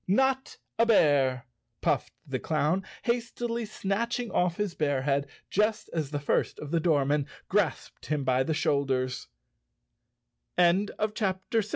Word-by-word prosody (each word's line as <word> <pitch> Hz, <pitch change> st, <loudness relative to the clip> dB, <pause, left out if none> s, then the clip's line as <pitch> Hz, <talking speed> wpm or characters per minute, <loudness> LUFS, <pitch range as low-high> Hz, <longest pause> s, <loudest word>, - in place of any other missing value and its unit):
"Not 265 Hz, +6 st, +1 dB, 0.2 s
a 230 Hz, -, +5 dB
bear!" 135 Hz, -, +4 dB, 0.4 s
puffed -, -, 0 dB
the -, -, -3 dB
clown, 170 Hz, +6 st, +1 dB, 0.2 s
hastily 235 Hz, -1 st, -1 dB
snatching 225 Hz, +4 st, -2 dB
off 180 Hz, -1 st, +1 dB
his 205 Hz, -4 st, -1 dB
bear 145 Hz, -4 st, 0 dB
head, 140 Hz, 0 st, +1 dB, 0.2 s
just 210 Hz, +2 st, +1 dB
as 155 Hz, -4 st, -1 dB
the 145 Hz, -1 st, -2 dB
first 140 Hz, -, 0 dB
of 150 Hz, -, -7 dB
the 170 Hz, -, +2 dB
doormen 145 Hz, -3 st, +2 dB, 0.3 s
grasped 200 Hz, -6 st, 0 dB
him 150 Hz, -2 st, 0 dB
by 130 Hz, 0 st, +2 dB
the 135 Hz, -3 st, 0 dB
155 Hz, 115 wpm, -28 LUFS, 140-210 Hz, 0.4 s, a